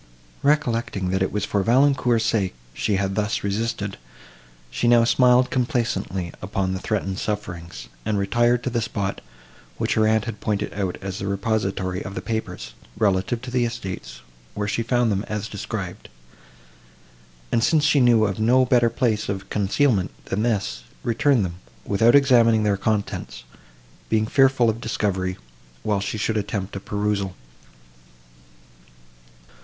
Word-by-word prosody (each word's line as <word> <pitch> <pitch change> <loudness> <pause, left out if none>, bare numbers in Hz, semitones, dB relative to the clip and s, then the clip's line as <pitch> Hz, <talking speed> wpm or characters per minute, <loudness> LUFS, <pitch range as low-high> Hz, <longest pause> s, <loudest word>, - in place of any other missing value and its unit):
Recollecting, 120 -10 +1
that 95 0 0
it 95 - +1
was 105 -1 -1
for 100 - 0
Valancourt's 125 0 +3
sake 100 - 0 0.2
she 100 - 0
had 95 0 0
thus 105 +2 -1
resisted, 100 -1 -2 0.7
she 120 - 0
now 120 -1 +6
smiled 125 +1 +4
complacently 115 -8 -1
upon 95 -1 -1
the 95 - -3
threatened 95 -2 -2
sufferings, 90 -5 -5 0.2
and 105 -1 0
retired 120 +5 +2
to 125 - -2
the 120 -1 0
spot, 100 -3 -3 0.6
which - - 0
her 110 -1 +3
aunt 110 -1 +2
had 115 -3 -5
pointed 105 -1 -2
out 95 -3 -2
as 95 0 -4
the 100 - -3
repository 100 -2 -1
of 95 - -7
the - - -3
papers, 110 - -4 0.2
relative 105 +4 +1
to 130 - -6
the 125 -1 +2
estates, 95 - -5 0.3
where 105 0 -2
she 110 - -1
found 120 0 +1
them 100 0 0
as 105 -1 -3
described; - - -6 1.4
and, 115 - +2
since 155 +2 +3
she 150 -1 +4
knew 120 -4 +5
of 100 -1 -2
no 125 +4 +4
better 120 -2 +4
place 115 -3 0
of 100 -1 -4
concealment, 105 -1 +2 0.2
than 100 - -2
this, 100 - -1 0.2
returned 120 -1 +2
them, 85 -1 -6 0.3
without 115 +5 +4
examining 120 -5 +5
their 105 -1 +2
contents, 105 - -2 0.7
being 110 -1 +2
fearful 135 0 +4
of 110 +1 0
discovery, 95 -5 -1 0.5
while 105 -2 +1
she 100 +2 -3
should 110 +1 0
attempt 100 -2 -3
a - - -3
perusal. 100 -2 -2
105 Hz, 150 wpm, -23 LUFS, 100-120 Hz, 1.4 s, now